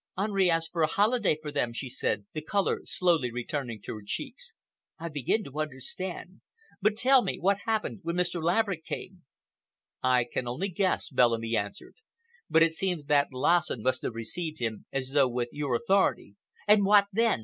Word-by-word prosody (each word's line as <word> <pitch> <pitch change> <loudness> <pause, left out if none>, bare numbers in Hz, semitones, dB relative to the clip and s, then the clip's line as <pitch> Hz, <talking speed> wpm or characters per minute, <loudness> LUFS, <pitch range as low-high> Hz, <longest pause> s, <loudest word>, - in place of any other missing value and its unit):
"Henri 195 -2 +2
asked 165 -1 0
for 170 - -2
a 155 - +4
holiday 210 -1 +2
for 155 -1 -6
them," 140 -5 0
she 125 +3 -5
said, 105 -5 -2
the 155 - -4
color 200 +6 0
slowly 170 -8 +1
returning 125 -1 -4
to - - -7
her 105 - -8
cheeks. 100 - -6 0.4
"I 170 +1 -5
begin 150 - 0
to 140 -1 -8
understand. 170 +6 -5 0.4
But 210 +2 +2
tell 260 +3 +6
me, - - -2
what 200 +2 +1
happened 220 -2 -1
when 170 -1 -3
Mr. 175 -1 0
Laverick 180 0 +1
came?" 180 0 -7 0.8
"I 125 -1 +3
can 120 +1 -4
only 160 +12 -2
guess," 185 +1 0
Bellamy 115 -3 +2
answered, 100 -1 -4 0.5
"but 160 +1 +5
it 165 -1 +2
seems 175 -4 -2
that 145 -1 +3
Lassen 130 -2 +1
must 130 - +1
have 115 - -4
received 155 +8 -4
him 115 -3 -4
as 135 -1 -2
though 140 -2 +4
with 120 0 -2
your 145 -4 -1
authority." 190 - +1 0.3
"And 210 0 +6
what 200 0 +6
then?" 225 - +2
160 Hz, 180 wpm, -28 LUFS, 125-190 Hz, 0.8 s, tell